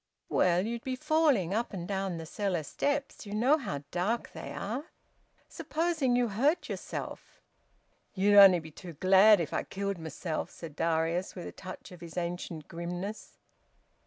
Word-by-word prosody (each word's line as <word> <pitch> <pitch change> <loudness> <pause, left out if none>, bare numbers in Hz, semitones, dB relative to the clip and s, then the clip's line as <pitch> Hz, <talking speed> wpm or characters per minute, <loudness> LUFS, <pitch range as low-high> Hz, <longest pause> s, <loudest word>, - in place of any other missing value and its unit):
"Well, 180 +1 +3
you'd 235 +1 -4
be 260 -1 -2
falling 295 - +2
up 230 +1 -1
and 175 -2 -5
down 195 -2 -2
the 165 - -6
cellar 185 -1 -2
steps. 280 - -2
You 205 - -4
know 265 +8 +4
how 145 - -4
dark 205 +7 -1
they - - -7
are. 240 +9 -4 0.6
Supposing 310 -6 0
you 245 -1 +2
hurt 275 - +1
yourself?" - - -6 0.8
"Ye'd 200 +2 +3
only 195 -3 +10
be 160 -1 -11
too 170 +2 -10
glad 190 +5 +6
if 165 - -3
I - - +1
killed 200 0 -3
mysen!" 160 +1 -4
said 160 -4 -10
Darius, 165 +3 0
with 180 - -6
a - - -6
touch 185 0 -10
of 180 -1 -12
his 170 0 -9
ancient 170 -3 -4
grimness. 175 +5 -6
195 Hz, 160 wpm, -30 LUFS, 170-235 Hz, 0.8 s, only